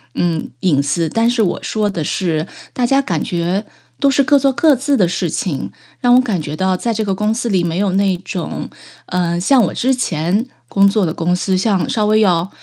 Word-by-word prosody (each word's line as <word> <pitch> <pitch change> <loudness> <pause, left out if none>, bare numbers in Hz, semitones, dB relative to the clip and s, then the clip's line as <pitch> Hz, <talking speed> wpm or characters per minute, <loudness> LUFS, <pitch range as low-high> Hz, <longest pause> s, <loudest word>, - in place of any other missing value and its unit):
嗯， 165 -3 -1
隐 145 -7 +2
私。 155 +3 0
但 230 +5 +1
是 240 -2 +1
我 180 - 0
说 210 -1 -1
的 175 -5 -4
是 160 -1 -1 0.2
大 245 - -1
家 275 +2 +3
感 170 - -2
觉 180 +4 -2 0.3
都 280 - +3
是 275 +1 +3
各 285 +1 +4
做 270 -1 +2
各 300 +4 +4
自 280 +3 0
的 190 - +3
事 175 -1 -2
情， 140 - -3 0.3
让 245 0 +4
我 255 - +6
感 205 -10 -2
觉 150 0 -5
到 185 +1 0
在 230 +3 -1
这 220 0 -1
个 195 -2 -1
公 210 +3 0
司 235 0 -2
里 185 -3 +1
没 170 +2 -1
有 200 -2 +1
那 195 -1 +2
种， 185 -2 -5 0.4
呃， 175 -1 -1
像 250 +7 +4
我 180 - -1
之 260 +2 +1
前 190 -1 -1 0.2
工 200 0 +4
作 200 -1 +2
的 160 - -2
公 175 +2 0
司， 185 +1 0
像 195 +2 0
稍 220 -5 0
微 215 +1 +3
要 180 -2 +2
195 Hz, 240 characters per minute, -17 LUFS, 175-230 Hz, 0.4 s, 我